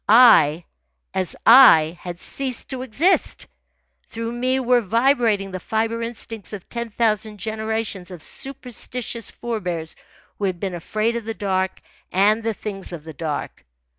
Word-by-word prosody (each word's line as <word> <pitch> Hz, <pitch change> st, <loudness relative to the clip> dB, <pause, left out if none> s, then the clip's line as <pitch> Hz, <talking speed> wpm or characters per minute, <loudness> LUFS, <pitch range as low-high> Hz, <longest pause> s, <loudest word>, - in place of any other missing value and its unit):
I, 205 Hz, -9 st, +7 dB, 0.5 s
as 185 Hz, -3 st, -2 dB
I, 175 Hz, -10 st, +8 dB
had 175 Hz, -1 st, -7 dB
ceased 260 Hz, +3 st, -5 dB
to 260 Hz, -1 st, -4 dB
exist. 285 Hz, -, +1 dB, 0.6 s
Through 230 Hz, 0 st, -4 dB
me 255 Hz, +2 st, 0 dB
were 250 Hz, -1 st, +3 dB
vibrating 230 Hz, -2 st, +2 dB
the 185 Hz, -, -4 dB
fibre 225 Hz, +4 st, -1 dB
instincts 225 Hz, -3 st, -6 dB
of 200 Hz, -3 st, -8 dB
ten 235 Hz, -1 st, -4 dB
thousand 215 Hz, -1 st, 0 dB
generations 220 Hz, -3 st, -3 dB
of 175 Hz, -4 st, -9 dB
superstitious 250 Hz, -3 st, -4 dB
forebears 180 Hz, -9 st, -4 dB, 0.4 s
who 205 Hz, -, 0 dB
had 185 Hz, -3 st, -2 dB
been 190 Hz, -1 st, -3 dB
afraid 215 Hz, +7 st, -1 dB
of 235 Hz, -2 st, -4 dB
the 225 Hz, 0 st, -4 dB
dark 190 Hz, -2 st, -1 dB, 0.3 s
and 205 Hz, +4 st, +3 dB
the 225 Hz, -1 st, -2 dB
things 195 Hz, -3 st, -5 dB
of 170 Hz, -4 st, -7 dB
the 160 Hz, 0 st, -9 dB
dark. 150 Hz, 0 st, -5 dB
220 Hz, 145 wpm, -22 LUFS, 185-235 Hz, 0.6 s, I